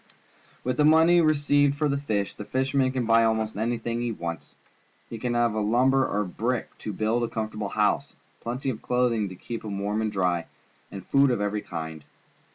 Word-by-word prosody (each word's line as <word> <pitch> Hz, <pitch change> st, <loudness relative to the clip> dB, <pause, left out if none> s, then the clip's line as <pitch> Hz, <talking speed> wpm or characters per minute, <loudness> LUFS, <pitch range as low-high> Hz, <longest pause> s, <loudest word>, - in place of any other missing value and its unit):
With 125 Hz, 0 st, -1 dB
the 150 Hz, -, +4 dB
money 160 Hz, +3 st, +6 dB
received 145 Hz, -2 st, +3 dB
for 150 Hz, 0 st, +1 dB
the 140 Hz, -, 0 dB
fish, 110 Hz, -8 st, -2 dB
the -, -, -8 dB
fisherman 130 Hz, +2 st, 0 dB
can 130 Hz, -2 st, -1 dB
buy 115 Hz, 0 st, +5 dB
almost 110 Hz, -1 st, 0 dB
anji, 115 Hz, +3 st, -1 dB
hing 120 Hz, 0 st, -2 dB
he 120 Hz, -1 st, -1 dB
wants. 85 Hz, -7 st, -6 dB, 0.6 s
He 115 Hz, -, -5 dB
can 120 Hz, +1 st, -2 dB
have 120 Hz, -2 st, +2 dB
lumber 120 Hz, +5 st, +3 dB
or 105 Hz, +1 st, 0 dB
brick 115 Hz, +6 st, -3 dB
to 110 Hz, -, -5 dB
build 110 Hz, +4 st, 0 dB
a -, -, 0 dB
comfortable 110 Hz, -2 st, -4 dB
hou.se, -, -, 0 dB, 0.2 s
plenty 125 Hz, +3 st, -3 dB
of 110 Hz, -, -8 dB
cloth 125 Hz, 0 st, +1 dB
ing 105 Hz, -3 st, -1 dB
to 95 Hz, -, -9 dB
keep 115 Hz, +5 st, -7 dB
him 100 Hz, -2 st, -4 dB
warm 105 Hz, +2 st, -1 dB
and 110 Hz, -1 st, -1 dB
dry, 90 Hz, -4 st, 0 dB, 0.4 s
and 95 Hz, -2 st, -8 dB
food 140 Hz, 0 st, +4 dB
of 120 Hz, -, 0 dB
every 105 Hz, +1 st, -1 dB
kind. 80 Hz, -4 st, -6 dB
115 Hz, 200 wpm, -26 LUFS, 105-130 Hz, 0.6 s, money